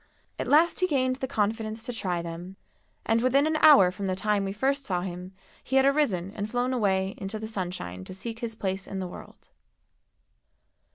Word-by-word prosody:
At - - -2
last 320 +3 +4
he 365 - +2
gained 260 -5 +1
the 265 - -3
confidence 220 0 -2
to 245 - -4
try 180 -6 -2
them, 170 +3 -7 0.5
and 225 +1 +2
within 265 +3 +3
an 315 0 +1
hour 280 -14 +7
from 195 +2 -4
the 185 - 0
time 205 +1 0
we 195 - -2
first 275 +7 0
saw 180 -7 -1
him 180 0 -6 0.3
he 265 - -3
had 265 0 +5
arisen 235 - +1
and 205 0 -4
flown 245 +2 0
away 195 -4 +1
into 195 +3 -4
the 220 0 -5
sunshine 175 - -5
to - - -8
seek 225 +3 -6
his 230 -1 -4
place 190 -2 -3
in 195 - -5
the 185 -1 -3
world. 175 - -12
210 Hz, 195 wpm, -27 LUFS, 190-255 Hz, 0.5 s, hour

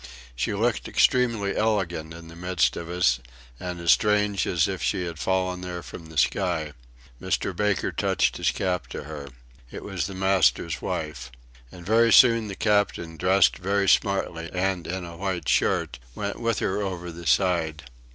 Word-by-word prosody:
She - - -1
looked - - 0
extremely 115 -6 +2
elegant 90 -7 -1
in 85 0 -10
the 80 - -12
midst 90 -1 0
of 85 0 -6
us, 85 -8 +2 0.4
and 90 -1 -5
as 85 -2 +3
strange 105 +5 +2
as - - +2
if - - -4
she 90 - 0
had 85 -2 -6
fallen 95 0 -1
there 90 -1 -6
from 80 - -10
the 80 -1 -11
sky. 80 -1 0 0.5
Mr. - - -1
Baker 105 -2 0
touched - - 0
his - - +1
cap 90 -9 -2
to - - -7
her. 75 -2 -8 0.4
It - - -8
was 90 -6 -3
the 100 - -8
master's 95 -4 +2
wife. 75 -6 -4 0.4
And 90 -2 -12
very 115 +3 +4
soon 115 0 +6
the 100 - -6
Captain, 100 -6 0
dressed 95 +4 +3
very 100 +1 0
smartly 90 -5 +1
and 95 -1 -1
in 90 +1 -4
a 85 -1 -9
white 95 -1 -3
shirt, 65 - +1 0.2
went 100 0 -4
with 115 -2 0
her 95 - -1
over 90 -3 -4
the 85 0 -8
side. 80 +2 +1
90 Hz, 170 wpm, -25 LUFS, 85-100 Hz, 0.5 s, soon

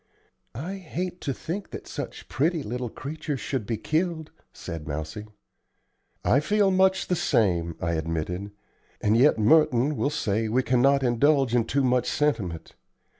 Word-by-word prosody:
"I 175 +11 -5
hate 180 0 -5
to 140 - -2
think 170 +9 -5
that - - -8
such - - -7
pretty 155 +4 0
little 125 +1 -4
creatures 145 +2 -5
should 130 -7 -3
be 115 - -1
killed," 160 - -1 0.2
said 80 -2 -7
Mousie. 80 +8 -5 1.0
"I 135 - +4
feel 205 +5 +2
much 190 0 +3
the 180 - 0
same," 85 - +1
I 85 - -1
admitted; 80 +4 -3 0.5
"and 105 +1 +2
yet 130 +4 +5
Merton 145 +3 +4
will 140 - 0
say 110 -6 -1
we 130 +4 +2
cannot 135 +3 +3
indulge 135 +1 +3
in 120 -2 +3
too 140 +3 0
much 125 -1 +2
sentiment. 100 - -1
130 Hz, 150 wpm, -26 LUFS, 105-155 Hz, 1.0 s, yet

